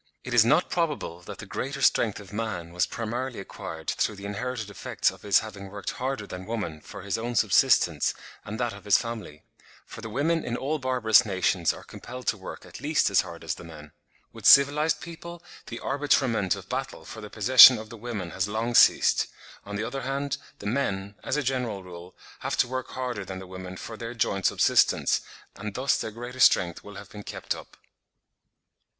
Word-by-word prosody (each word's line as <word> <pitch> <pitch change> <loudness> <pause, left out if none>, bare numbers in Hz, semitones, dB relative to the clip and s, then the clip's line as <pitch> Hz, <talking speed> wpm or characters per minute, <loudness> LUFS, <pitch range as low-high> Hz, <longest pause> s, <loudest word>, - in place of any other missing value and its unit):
It 125 - -5
is 120 -2 +7
not 150 +9 +3
probable 150 - -2
that - - -9
the - - -8
greater 140 +1 -4
strength 110 -3 +3
of 100 -2 -12
man 100 -6 -4
was 90 -1 +1
primarily 120 +3 -4
acquired 80 -4 -8
through 105 - 0
the 100 0 -9
inherited 110 +1 -4
effects 100 - 0
of - - -15
his 100 -1 +4
having 100 -3 -9
worked 100 0 -5
harder 130 -4 -3
than 90 -1 -8
woman 105 -9 -4
for - - -10
his 100 +1 -2
own 120 +1 -3
subsistence - - +3 0.3
and 110 +2 -6
that 120 -3 -1
of 100 - -12
his 105 - +5
family; 110 -11 -6 0.4
for - - -10
the 110 - -6
women 155 +8 0
in 120 0 -3
all 150 +4 -2
barbarous 125 -4 +4
nations 95 -4 +1
are - - -10
compelled 125 +1 -9
to - - 0
work 95 - -9
at - - -11
least - - +2
as - - +5
hard - - -10
as - - -2
the - - -10
men. 75 -2 -11 0.4
With - - -2
civilised 145 +3 +6
people 170 0 -9 0.2
the 115 - -6
arbitrament 130 -8 +1
of 95 -1 -10
battle 130 +3 -4
for 110 - -9
the 105 - -8
possession 125 +4 +9
of 110 +1 -9
the 115 - -9
women 105 -6 -5
has 95 +1 -1
long 110 +3 -2
ceased; - - +5 0.4
on 100 - -5
the 105 - -2
other 130 +4 -4
hand, 140 +1 -2 0.2
the - - -11
men, 100 -4 -1
as 140 - -1
a 150 - 0
general 125 -6 -2
rule, 90 0 -11 0.2
have - - -3
to - - +3
work 130 0 -4
harder 125 -5 -4
than 95 0 -7
the 95 - -8
women 95 0 -8
for 110 - -7
their 115 +1 -6
joint 100 -4 +1
subsistence, - - +3 0.4
and 105 0 -6
thus 130 +2 +2
their - - -3
greater 120 +3 -8
strength 85 -8 +4
will 105 0 -11
have 100 0 -10
been 105 - -8
kept - - -4
up. - - -12
110 Hz, 205 wpm, -27 LUFS, 100-130 Hz, 0.4 s, possession